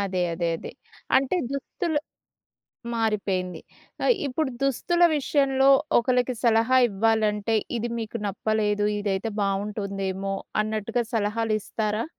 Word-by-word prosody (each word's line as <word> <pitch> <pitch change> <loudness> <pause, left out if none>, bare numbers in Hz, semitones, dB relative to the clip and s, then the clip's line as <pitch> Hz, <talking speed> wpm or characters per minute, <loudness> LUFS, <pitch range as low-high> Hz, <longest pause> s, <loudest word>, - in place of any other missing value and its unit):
అదే. 190 -2 -1
అదే. 170 0 -1
అదే. - - -8 0.5
అంటే 270 +6 +2
దుస్తులు 295 +3 -2 1.0
మారిపోయింది. 195 -6 -1 0.4
ఆహ్, - - +5
ఇప్పుడు 280 +1 -1
దుస్తుల 345 +6 +1
విషయంలో 270 -1 +2 0.3
ఒకళ్ళకి 250 +1 +1
సలహా 230 +2 +4
ఇవ్వాలంటే, 215 +1 +1 0.2
ఇది 235 - -2
మీకు 225 +1 -5
నప్పలేదు. 210 +1 0 0.2
ఇదైతే 205 +2 -1
బాగుంటుందేమో, 195 -1 -2 0.3
అన్నట్టుగా 220 +2 -1
సలహాలు 220 +1 0
ఇస్తారా? 215 +1 -2
220 Hz, 105 wpm, -25 LUFS, 200-250 Hz, 1.0 s, ఆహ్